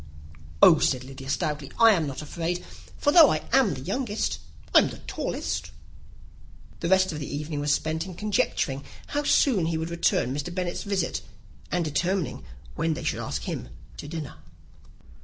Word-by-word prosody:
"Oh," 160 Hz, -, +9 dB
said 130 Hz, -2 st, +1 dB
Lydia, 135 Hz, +1 st, -9 dB
stoutly, 150 Hz, -3 st, -2 dB
"I 230 Hz, -1 st, +8 dB
am 165 Hz, -7 st, +1 dB
not 140 Hz, +2 st, -5 dB
afraid; 170 Hz, +3 st, -3 dB, 0.3 s
for 290 Hz, -, +2 dB
though 320 Hz, -3 st, +9 dB
I -, -, -1 dB
am 260 Hz, -8 st, +4 dB
the -, -, -7 dB
youngest, 215 Hz, +2 st, -2 dB, 0.3 s
I'm -, -, +6 dB
the -, -, -9 dB
tallest." -, -, -3 dB, 1.1 s
The 170 Hz, -, -2 dB
rest 190 Hz, 0 st, +4 dB
of 155 Hz, -, -5 dB
the 145 Hz, -, -5 dB
evening 150 Hz, +1 st, -3 dB
was 145 Hz, 0 st, 0 dB
spent 160 Hz, +4 st, 0 dB
in 185 Hz, -, -8 dB
conjecturing 160 Hz, -9 st, 0 dB, 0.3 s
how 290 Hz, -, 0 dB
soon 235 Hz, -, +3 dB
he 165 Hz, -1 st, 0 dB
would 160 Hz, +1 st, -3 dB
return 170 Hz, -6 st, +1 dB
Mr. 145 Hz, +5 st, -3 dB
Bennet's 175 Hz, -1 st, -3 dB
visit, 195 Hz, -4 st, -1 dB, 0.5 s
and 175 Hz, -2 st, +1 dB
determining 175 Hz, +3 st, -1 dB, 0.3 s
when 165 Hz, -, 0 dB
they -, -, -6 dB
should -, -, -1 dB
ask -, -, -3 dB
him -, -, -5 dB, 0.3 s
to -, -, -7 dB
dinner. 150 Hz, -, -6 dB
165 Hz, 170 wpm, -26 LUFS, 150-190 Hz, 1.1 s, Oh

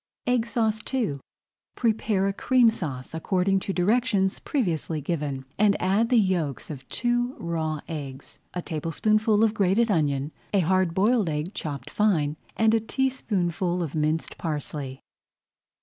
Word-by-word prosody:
EGG 245 Hz, -2 st, +1 dB
SAUCE 220 Hz, -2 st, 0 dB
II 185 Hz, -, 0 dB, 0.6 s
Prepare 220 Hz, -4 st, +1 dB
a 195 Hz, -, 0 dB
Cream 245 Hz, +2 st, +4 dB
Sauce 140 Hz, -, -5 dB
according 190 Hz, +4 st, +1 dB
to 195 Hz, -, -3 dB
directions 195 Hz, 0 st, +2 dB
previously 170 Hz, -, -1 dB
given, 145 Hz, -3 st, -3 dB
and 205 Hz, -1 st, +4 dB
add 200 Hz, +5 st, +2 dB
the 250 Hz, -, +4 dB
yolks 175 Hz, -, 0 dB
of 135 Hz, -3 st, -9 dB
two 240 Hz, +1 st, 0 dB
raw 160 Hz, -3 st, -2 dB
eggs, 140 Hz, -4 st, -7 dB, 0.2 s
a 180 Hz, -, -2 dB
tablespoonful 215 Hz, +7 st, +1 dB
of 220 Hz, -1 st, +3 dB
grated 210 Hz, +3 st, +2 dB
onion, 145 Hz, -4 st, +1 dB, 0.2 s
a 195 Hz, -, +5 dB
hard 185 Hz, 0 st, +2 dB
boiled 210 Hz, -1 st, +3 dB
egg, 155 Hz, +5 st, -3 dB
chopped 140 Hz, -7 st, -5 dB
fine, 160 Hz, -9 st, +2 dB, 0.2 s
and 220 Hz, 0 st, +4 dB
a 225 Hz, -, +4 dB
teaspoonful 190 Hz, -, -1 dB
of 155 Hz, -, -5 dB
minced 155 Hz, +1 st, -1 dB
parsley. 145 Hz, -4 st, -4 dB
185 Hz, 140 wpm, -26 LUFS, 155-220 Hz, 0.6 s, a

